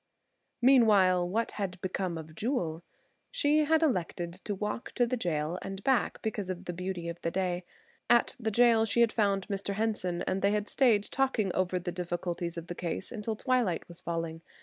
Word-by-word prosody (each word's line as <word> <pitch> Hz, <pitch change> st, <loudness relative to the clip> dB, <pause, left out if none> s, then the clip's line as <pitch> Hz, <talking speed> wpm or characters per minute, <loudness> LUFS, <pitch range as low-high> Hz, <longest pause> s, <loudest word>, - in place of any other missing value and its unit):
Meanwhile 200 Hz, -9 st, +5 dB
what 225 Hz, +5 st, 0 dB
had 190 Hz, -3 st, -4 dB
become 185 Hz, -2 st, -2 dB
of 160 Hz, -1 st, -9 dB
Jewel? 175 Hz, -, -2 dB, 0.5 s
She 305 Hz, -10 st, +2 dB
had 320 Hz, +1 st, +3 dB
elected 175 Hz, -, -1 dB
to 205 Hz, -, -2 dB
walk 210 Hz, +4 st, -4 dB
to 245 Hz, -, +3 dB
the 245 Hz, +2 st, -1 dB
jail 170 Hz, -5 st, -1 dB
and 195 Hz, 0 st, -6 dB
back 265 Hz, -2 st, +1 dB
because 210 Hz, -4 st, -3 dB
of 185 Hz, -1 st, -5 dB
the 175 Hz, -, -4 dB
beauty 180 Hz, -1 st, -4 dB
of 170 Hz, 0 st, -6 dB
the 165 Hz, -, 0 dB
day. 180 Hz, 0 st, -1 dB, 0.4 s
At 240 Hz, -1 st, +4 dB
the 225 Hz, -2 st, -1 dB
jail 230 Hz, 0 st, +5 dB
she 235 Hz, +1 st, +4 dB
found 200 Hz, -4 st, 0 dB
Mr. 200 Hz, -1 st, -2 dB
Henson, 200 Hz, -5 st, -1 dB
and 190 Hz, +1 st, -1 dB
they 200 Hz, +1 st, +3 dB
had 210 Hz, 0 st, -1 dB
stayed 235 Hz, -7 st, +3 dB
talking 230 Hz, -7 st, 0 dB
over 185 Hz, 0 st, 0 dB
the 175 Hz, 0 st, -3 dB
difficulties 175 Hz, -1 st, -3 dB
of 165 Hz, -, -5 dB
the 175 Hz, -, -5 dB
case 175 Hz, +2 st, -4 dB
until 220 Hz, -1 st, -3 dB
twilight 245 Hz, -6 st, 0 dB
was 170 Hz, -1 st, -12 dB
falling. 165 Hz, -1 st, -3 dB
195 Hz, 185 wpm, -30 LUFS, 175-225 Hz, 0.5 s, Meanwhile